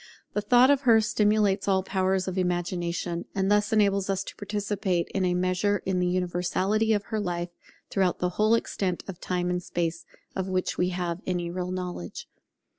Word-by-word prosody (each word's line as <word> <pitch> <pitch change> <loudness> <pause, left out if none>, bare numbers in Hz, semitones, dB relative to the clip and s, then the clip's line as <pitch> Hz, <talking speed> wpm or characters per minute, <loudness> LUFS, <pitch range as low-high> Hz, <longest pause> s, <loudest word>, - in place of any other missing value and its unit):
The 210 - 0
thought 245 +5 +5
of 280 -1 +3
her 230 -4 +6
stimulates 210 -2 +2
all 190 -1 +3
the - - -18
powers 190 0 +1
of 185 - -2
Imagination, 175 -1 -1
and 195 0 +1
thus 205 0 +3
enables 200 -3 +2
us 195 -1 0
to - - -9
participate 205 -3 -1
in 195 - -1
a 180 0 +1
measure 185 +3 +1
in 185 -1 0
the 180 - +1
universality 185 +4 0
of 205 -1 0
her 215 - +1
life, 175 -3 -2 0.4
throughout 190 -2 +1
the 180 - 0
whole 215 +5 +3
extent 190 -5 -2
of 185 -3 -8
Time 180 -1 -1
and 180 0 -1
Space 170 -1 -2 0.3
of 190 0 -2
which 185 -1 -1
we 180 - +1
have 175 -1 -3
any 175 -2 -1
real 180 0 -3
knowledge. 180 - -5
185 Hz, 190 wpm, -27 LUFS, 180-205 Hz, 0.4 s, her